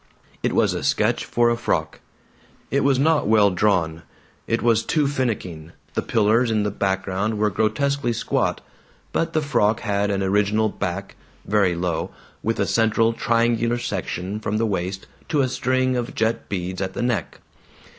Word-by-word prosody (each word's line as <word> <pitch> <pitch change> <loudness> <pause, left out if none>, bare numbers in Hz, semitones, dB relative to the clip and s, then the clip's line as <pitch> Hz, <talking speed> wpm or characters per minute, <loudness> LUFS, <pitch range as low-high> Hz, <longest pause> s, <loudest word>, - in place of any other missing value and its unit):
It - - 0
was - - +2
a - - -4
sketch - - +1
for 120 0 +2
a - - +2
frock. 115 - -2 0.7
It 140 - +2
was 135 -1 +3
not 155 0 +2
well 105 -2 +5
drawn; 90 -4 +1 0.5
it 115 - 0
was 115 -2 +4
too 150 +5 +1
finicking; 100 - -3 0.2
the - - 0
pillars 115 +3 +2
in 110 -2 +1
the 105 - -1
background 95 +2 -1
were 105 0 +1
grotesquely 120 +6 0
squat. 115 - -1 0.5
But 165 0 -1
the 155 - +1
frock 115 -6 +1
had 100 0 0
an 100 -1 0
original 105 +3 +2
back, 100 0 -4 0.3
very 100 -4 +2
low, 85 -1 -2 0.3
with - - -1
a - - +2
central 115 0 +2
triangular 115 +1 +1
section 105 -4 -3
from 105 0 -2
the 115 - +1
waist 95 -2 -3 0.2
to 150 -3 +2
a 130 - +2
string 130 0 0
of 120 -1 -3
jet 110 +1 -1
beads 95 -1 -3
at 95 -1 -3
the - - -3
neck. 115 -8 -1
110 Hz, 165 wpm, -23 LUFS, 100-120 Hz, 0.7 s, well